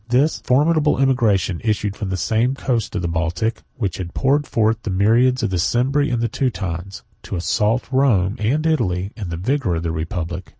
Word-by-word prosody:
This 135 +6 +2
formidable 150 +3 +2
emigration 115 -10 +1
issued 105 -2 -1
from 105 -3 -4
the 95 - -2
same 115 +8 +1
coast 120 -5 -2
of 95 - -2
the - - 0
Baltic, 85 +7 -1
which 100 - -2
had 90 -2 -6
poured 145 +2 +1
forth 110 0 +1
the 110 - -5
myriads 115 +7 +3
of - - 0
the 90 - 0
Cimbri 135 - +1
and 120 -2 0
Teutones, 95 -7 -3 0.2
to - - -6
assault 105 +7 +1
Rome 115 -8 +2
and 135 +9 0
Italy 100 - 0
in 100 -6 -6
the 85 - -4
vigor 110 - 0
of 80 - -3
the 85 - -1
republic. 85 +2 -4
110 Hz, 185 wpm, -20 LUFS, 90-130 Hz, 0.2 s, myriads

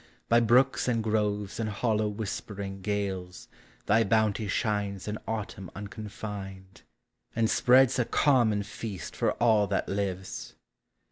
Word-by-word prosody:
By 115 - +6
brooks 125 +4 +3
and 115 -3 +1
groves 105 -2 -1
in 110 - -1
hollow 110 0 0
whispering 100 -2 -5
gales 95 -3 -3 0.4
Thy 110 +2 +4
bounty 110 0 +1
shines 100 -2 -1
in 105 +1 -3
Autumn 110 -4 -4
unconfined, 100 -2 -7 0.5
And 115 -1 +2
spreads 125 +3 +4
a 120 - +2
common 115 -9 +3
feast 100 -2 -7
for - - +1
all 110 -3 +3
that 100 - -1
lives. 95 -1 -4
105 Hz, 125 wpm, -28 LUFS, 100-115 Hz, 0.5 s, By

